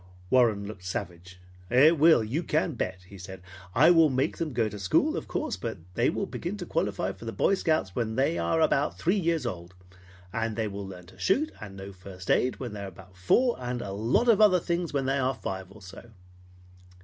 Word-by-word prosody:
Warren 115 Hz, -6 st, +3 dB
looked 100 Hz, -3 st, -9 dB
savage. 90 Hz, 0 st, -6 dB, 0.3 s
"It 145 Hz, +6 st, +5 dB
will, 160 Hz, -6 st, +6 dB
you 125 Hz, +10 st, -2 dB
can 160 Hz, 0 st, 0 dB
bet," 95 Hz, -6 st, -4 dB
he 100 Hz, 0 st, -12 dB
said. 95 Hz, +1 st, -9 dB, 0.4 s
"I 155 Hz, +7 st, +7 dB
will 165 Hz, -3 st, +6 dB
make 130 Hz, 0 st, 0 dB
them 165 Hz, -2 st, -2 dB
go 115 Hz, -3 st, +1 dB
to 105 Hz, -1 st, -7 dB
school, 95 Hz, -2 st, +2 dB
of -, -, -5 dB
course, -, -, -3 dB
but -, -, -4 dB, 0.2 s
they -, -, +2 dB
will -, -, -2 dB
begin -, -, -5 dB
to -, -, -6 dB
qualify -, -, -1 dB
for -, -, -12 dB
the 115 Hz, -, -3 dB
Boy 195 Hz, -, +2 dB
Scouts 155 Hz, -, 0 dB
when 110 Hz, -2 st, -1 dB
they 130 Hz, -9 st, +1 dB
are 85 Hz, -, +1 dB
about 150 Hz, -2 st, +2 dB
three 190 Hz, +5 st, +1 dB
years 165 Hz, -5 st, 0 dB
old; 90 Hz, -5 st, -6 dB, 0.6 s
and 115 Hz, -1 st, -2 dB
they 110 Hz, -1 st, -1 dB
will 100 Hz, -1 st, -6 dB
learn 90 Hz, -2 st, -10 dB
to 90 Hz, -, -18 dB
shoot, 300 Hz, +11 st, +1 dB
and 100 Hz, -2 st, -9 dB
know 95 Hz, +1 st, -8 dB
first 95 Hz, 0 st, -6 dB
aid 125 Hz, -, +2 dB
when 120 Hz, -5 st, -5 dB
they 105 Hz, -, -6 dB
are 100 Hz, -, -5 dB
about 95 Hz, 0 st, -14 dB
four, 235 Hz, -, +2 dB
and 125 Hz, 0 st, -3 dB
a 100 Hz, -, -5 dB
lot 115 Hz, -, +1 dB
of 220 Hz, -3 st, +5 dB
other 195 Hz, -4 st, +6 dB
things 170 Hz, 0 st, -2 dB
when 140 Hz, -2 st, -1 dB
they 135 Hz, +1 st, +1 dB
are 130 Hz, 0 st, 0 dB
five 95 Hz, -3 st, -5 dB
or 105 Hz, 0 st, -14 dB
so." 95 Hz, +5 st, -12 dB
115 Hz, 220 wpm, -27 LUFS, 95-155 Hz, 0.6 s, I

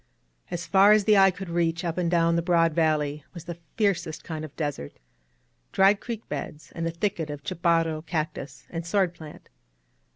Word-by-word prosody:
As 170 Hz, -1 st, -4 dB
far 195 Hz, +4 st, +6 dB
as 215 Hz, -1 st, +4 dB
the 215 Hz, +1 st, +4 dB
eye 195 Hz, -1 st, +7 dB
could 190 Hz, +1 st, -6 dB
reach 170 Hz, 0 st, 0 dB
up 165 Hz, -1 st, -2 dB
and 175 Hz, -2 st, 0 dB
down 170 Hz, -1 st, +3 dB
the 170 Hz, -, +2 dB
broad 165 Hz, -2 st, +3 dB
valley 150 Hz, -2 st, +1 dB
was 170 Hz, -, -8 dB
the 170 Hz, -1 st, -7 dB, 0.2 s
fiercest 180 Hz, -7 st, 0 dB
kind 155 Hz, -2 st, -5 dB
of 155 Hz, -, -9 dB
desert, 145 Hz, -, -4 dB, 0.4 s
— -, -, -44 dB
dried 195 Hz, +1 st, +5 dB
creek 230 Hz, -2 st, -6 dB
beds, 150 Hz, +1 st, -6 dB
and 165 Hz, -1 st, -3 dB
a -, -, 0 dB
thicket 170 Hz, -1 st, -2 dB
of 145 Hz, -1 st, -7 dB
chaparral, 165 Hz, -2 st, +1 dB
cac 155 Hz, -2 st, -2 dB
tus 135 Hz, -2 st, -10 dB
and 165 Hz, -1 st, -4 dB
sword 180 Hz, +1 st, +1 dB
plant. 160 Hz, -3 st, -12 dB
165 Hz, 195 wpm, -26 LUFS, 155-180 Hz, 0.4 s, eye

